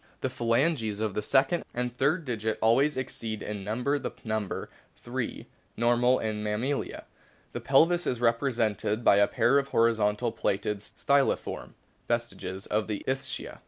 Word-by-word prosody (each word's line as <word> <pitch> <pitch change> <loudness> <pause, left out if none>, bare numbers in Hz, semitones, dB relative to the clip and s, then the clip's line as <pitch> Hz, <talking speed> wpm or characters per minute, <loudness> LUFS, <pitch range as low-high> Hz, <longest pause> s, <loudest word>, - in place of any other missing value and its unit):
The - - -1
phalanges 115 -2 +1
of 110 -2 -1
the 105 - -1
second 135 +10 +2
and 125 0 -2
third 150 +6 +1
digit 110 -3 -2
always 130 +6 +3
exceed 115 -4 -4
in 105 -2 -5
number 125 +8 0
the - - -3
number 110 -3 -3 0.3
(three) - - -5 0.3
normal 120 +2 +3
in 105 -1 -3
the 105 - -1
Mammalia. 125 +7 -2 0.5
The - - -5
pelvis 165 +6 +3
is 125 - -1
represented 115 -3 +1
by 100 - +6
a 100 0 +5
pair 135 +4 +3
of 140 - -3
horizontally 115 -1 +2
placed 100 -3 -1 0.3
styliform 140 -1 0 0.3
vestiges 95 -5 -3
of 105 0 -1
the 105 -2 -3
ischia. 135 0 -3
115 Hz, 150 wpm, -28 LUFS, 105-135 Hz, 0.5 s, by